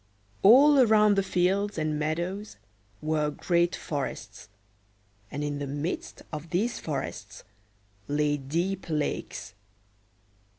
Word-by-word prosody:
All 275 +8 +7
around 215 -4 +5
the 195 - +2
fields 190 +2 0
and 155 -1 -1
meadows 175 - -3 0.5
were 155 -1 +1
great 170 +3 +1
forests, 130 -8 -5 0.8
and 145 +1 -4
in 145 -1 -2
the 145 - -3
midst 145 +5 -4
of 155 +2 -6
these 210 +8 0
forests 120 -9 -5 0.6
lay 145 0 +1
deep 170 +7 -2
lakes. 150 -2 -3
160 Hz, 110 wpm, -27 LUFS, 145-195 Hz, 0.8 s, All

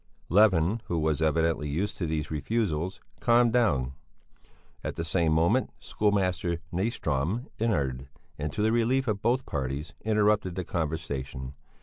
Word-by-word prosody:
Levin, 100 +1 +4
who 85 - -2
was 80 -1 +1
evidently 80 -1 +1
used 95 +8 -1
to 85 - -2
these 75 -1 -2
refusals, 90 +1 -1 0.2
calmed 120 -1 +4
down. 70 - +2 0.9
At - - -3
the 85 - -3
same 85 -2 +2
moment 85 +11 +3
schoolmaster 90 -4 0 0.2
Nyström 90 - -1
entered, 70 - 0 0.3
and, 75 0 -3
to 105 - -1
the 110 - +3
relief 125 +3 +2
of 105 -2 -1
both 125 +2 +1
parties, 70 +1 -3
interrupted 105 -4 +2
the 95 - -2
conversation. 70 -6 -3
85 Hz, 135 wpm, -28 LUFS, 75-110 Hz, 0.9 s, Levin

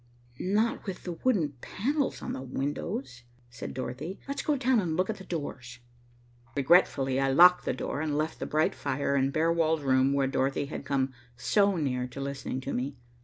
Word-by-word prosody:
"Not 210 +4 0
with 190 - -5
the 180 - -4
wooden 165 - 0
panels 280 +7 -1
on - - -3
the - - -5
windows," 130 -1 -4 0.3
said 120 - -7
Dorothy. 130 +8 -5
"Let's 280 - -2
go 300 - +1
down 255 -2 +3
and 165 -5 -1
look 185 +4 +1
at 215 - -7
the 190 - -10
doors." 135 -8 -5 0.8
Regretfully 140 -3 +3
I 135 0 +2
locked 180 +5 +7
the - - 0
door 140 +3 -3
and 150 -2 -1
left 155 +1 -2
the - - -3
bright 155 +1 +2
fire 140 0 -1
and 135 0 +2
bare 165 +3 +2
walled 160 -2 +1
room 130 0 +3
where 140 -1 +2
Dorothy 135 +1 0
had 140 - -6
come 135 -1 0 0.2
so 200 - +3
near 125 -6 -1
to 125 +2 -9
listening 135 -1 -4
to 135 - -4
me. 135 +3 -2
145 Hz, 190 wpm, -29 LUFS, 135-180 Hz, 0.8 s, locked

